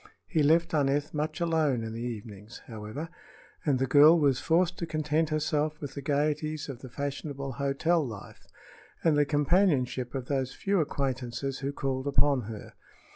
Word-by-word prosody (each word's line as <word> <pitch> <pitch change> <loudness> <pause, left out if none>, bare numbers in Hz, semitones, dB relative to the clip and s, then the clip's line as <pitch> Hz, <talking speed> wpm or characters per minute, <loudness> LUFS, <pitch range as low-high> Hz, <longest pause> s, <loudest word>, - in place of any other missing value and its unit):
He 160 - 0
left 160 +4 +3
Aneth 145 0 +1
much 155 +4 -2
alone 155 -8 +1
in 110 0 -5
the 115 - -5
evenings, 110 -2 -7
however, 110 +7 -6 0.6
and 145 -4 +2
the 135 - +1
girl 145 +5 +7
was 140 -5 +2
forced 175 +2 +1
to 170 - -3
content 155 0 0
herself 155 0 0
with 145 -3 -6
the 140 - -6
gaieties 150 +2 -1
of 130 -4 -6
the 130 - -10
fashionable 140 +1 -4
hotel 140 +5 +1
life 110 -7 -9 0.6
and 160 -2 +4
the 145 0 +4
companionship 145 -5 +1
of 130 -2 -3
those 135 -1 -2
few 200 -1 0
acquaintances 135 -3 -2
who 140 +1 -2
called 135 -1 -3
upon 140 -1 +3
her. 110 -2 -8
145 Hz, 165 wpm, -29 LUFS, 130-155 Hz, 0.6 s, girl